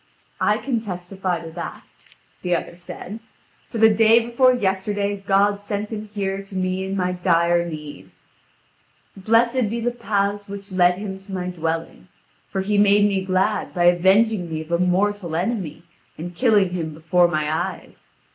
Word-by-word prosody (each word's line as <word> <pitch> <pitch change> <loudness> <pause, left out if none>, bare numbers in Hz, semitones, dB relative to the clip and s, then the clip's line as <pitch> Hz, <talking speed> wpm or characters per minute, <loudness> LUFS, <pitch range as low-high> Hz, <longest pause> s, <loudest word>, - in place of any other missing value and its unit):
"I 210 - +2
can 245 -1 -1
testify 185 -3 -4
to 165 -1 -8
that," 170 +1 -8 0.5
the 180 -1 +1
other 170 - -4
said: 180 +4 -9 0.5
"for - - -5
the 220 0 +6
day 225 +1 +6
before 240 +2 +3
yesterday 200 -1 -1
God 200 +1 +3
sent 205 +1 -4
him 215 -1 -6
here 195 -2 -2
to 195 0 -12
me 185 0 -1
in 190 +1 -3
my 180 -1 0
dire 170 -1 +2
need. 150 - -9 1.1
Blessed 230 +4 +2
be 235 +2 -2
the 240 +1 0
paths 205 -3 -1
which 200 0 -8
led 180 -1 +4
him 195 -1 -6
to 195 +1 -14
my 180 -1 -3
dwelling. 165 +1 -4 0.4
For 190 - -2
he 205 +1 +1
made 205 0 +5
me 195 -2 0
glad 190 +3 0
by 175 - +1
avenging 190 +2 +4
me 155 0 -3
of 160 +1 -10
a 170 - +2
mortal 180 -1 0
enemy 180 -4 -2 0.3
and 175 +3 -6
killing 205 -3 +3
him 160 -4 -4
before 175 +3 +3
my 155 -3 -1
eyes. 175 +4 -5
190 Hz, 165 wpm, -22 LUFS, 175-210 Hz, 1.1 s, the